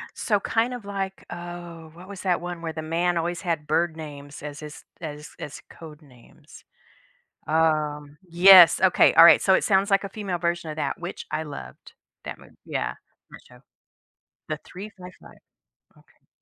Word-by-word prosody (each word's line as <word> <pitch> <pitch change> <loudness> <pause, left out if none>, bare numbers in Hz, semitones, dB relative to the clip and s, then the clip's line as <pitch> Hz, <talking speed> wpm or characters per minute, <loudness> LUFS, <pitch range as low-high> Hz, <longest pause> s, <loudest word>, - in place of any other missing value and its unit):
So, 205 -3 0
kind 230 +5 0
of 245 -4 -8
like 195 -1 -5
Oh 175 -2 -9
what 180 +3 -13
was 200 -2 -9
that 180 -3 0
one 175 -1 -7
where 165 -1 -4
the 155 0 -6
man 170 +2 0
always 170 +1 -2
had 165 -5 -2
bird 160 +1 0
names 145 -2 -10
as 145 0 -7
his 150 -1 -10 0.2
as 150 -2 -8
as 145 - -8
code 155 -1 -13
names? 125 -5 -19 0.8
Um? 150 -2 0
Yes, 175 0 +8
okay, 190 -1 +5
alright, 165 +1 +8
so 190 - +3
it - - +3
sounds 195 0 +2
like 195 0 +3
a 195 - -5
female 200 -3 -4
version 170 -1 -2
of 155 - -5
that, - - -3
which 175 +1 -7
I 155 +1 -2
loved 65 - -11 0.3
that - - -6
mov - - -18
yeah, 60 0 -3 0.4
that - - -12
show. - - -18 0.9
The 155 - -2
355, 185 -2 -12 0.6
okay. - - -27
170 Hz, 170 wpm, -24 LUFS, 155-185 Hz, 0.9 s, Yes